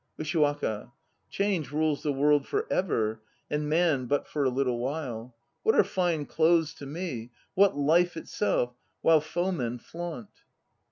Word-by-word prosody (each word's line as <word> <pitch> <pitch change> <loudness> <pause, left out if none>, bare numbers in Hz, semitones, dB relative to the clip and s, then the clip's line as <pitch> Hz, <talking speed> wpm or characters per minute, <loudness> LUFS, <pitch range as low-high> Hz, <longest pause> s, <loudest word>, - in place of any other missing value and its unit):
USHIWAKA. 145 -8 0 0.4
Change 195 -8 -1
rules 155 -1 +1
the 150 - 0
world 145 +1 +3
for 420 +2 -1
ever, 110 - 0 0.3
and 150 0 -1
Man 155 -6 +2
but 145 +3 0
for 150 - -1
a 130 - +3
little 125 -2 0
while. 125 -3 -4 0.3
What 445 +1 +3
are - - +6
fine 175 -5 0
clothes 160 0 +3
to 140 - -7
me, 145 -7 -5 0.2
what 195 -5 +4
life 165 +4 +3
itself 145 -8 -1 0.3
while 160 -2 +6
foemen 155 -7 -2
flaunt? 165 - -8
150 Hz, 145 wpm, -28 LUFS, 130-170 Hz, 0.4 s, are